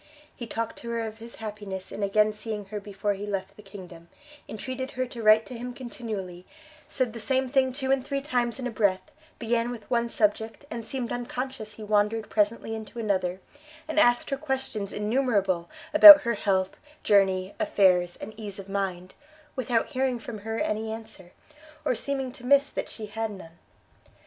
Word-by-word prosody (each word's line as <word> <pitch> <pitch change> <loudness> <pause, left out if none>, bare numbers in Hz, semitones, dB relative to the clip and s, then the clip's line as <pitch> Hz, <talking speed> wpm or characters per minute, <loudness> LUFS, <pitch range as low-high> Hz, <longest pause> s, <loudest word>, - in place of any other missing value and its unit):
He 235 - -7
talked 230 0 -4
to 235 - -7
her 230 0 -1
of 220 0 -6
his 230 +1 -10
happiness 205 -3 -6
in - - -6
again 210 +2 +3
seeing 210 -1 -5
her 210 - -2
before 205 0 -2
he 200 +1 -6
left 200 -1 -4
the 210 - -13
kingdom, 185 -4 -12 0.4
entreated 260 +4 -5
her 255 - +1
to 245 -2 -8
write 215 0 +6
to 255 - -9
him 245 +1 -6
continually, 215 -8 -6 0.4
said 255 -4 -1
the 230 - -7
same 260 +4 +1
thing 260 0 +2
two 265 0 -2
and 270 -1 +2
three 275 +1 -2
times 245 -4 -1
in 260 - -5
a 250 - -2
breath, 200 -4 0 0.3
began 235 0 0
with 230 -4 -7
one 235 -1 +1
subject, 220 +4 0
and 230 0 -4
seemed 250 -1 -3
unconscious 245 -2 -4
he 215 - -10
wandered 210 +1 +1
presently 220 +1 +1
into 220 0 -8
another, 190 -4 -1 0.5
and 315 0 +1
asked 240 -4 +4
her 275 - 0
questions 265 -8 -3
innumerable 210 -6 0 0.2
about 310 -1 +13
her 235 - 0
health, 190 -3 0 0.3
journey, 190 -2 +3
affairs, 185 - +3
and 215 - -9
ease 205 -3 -6
of 195 -1 -9
mind, 190 -2 -3 0.4
without 245 -3 0
hearing 260 -3 0
from 230 -1 -8
her 225 +2 -4
any 220 -7 -1
answer, 220 -5 -9 0.5
or - - +2
seeming 270 +1 -3
to 245 - -14
miss 280 +2 +4
that - - -4
she 220 - -7
had 225 +1 -3
none. 175 -4 -11
220 Hz, 185 wpm, -27 LUFS, 200-250 Hz, 0.5 s, about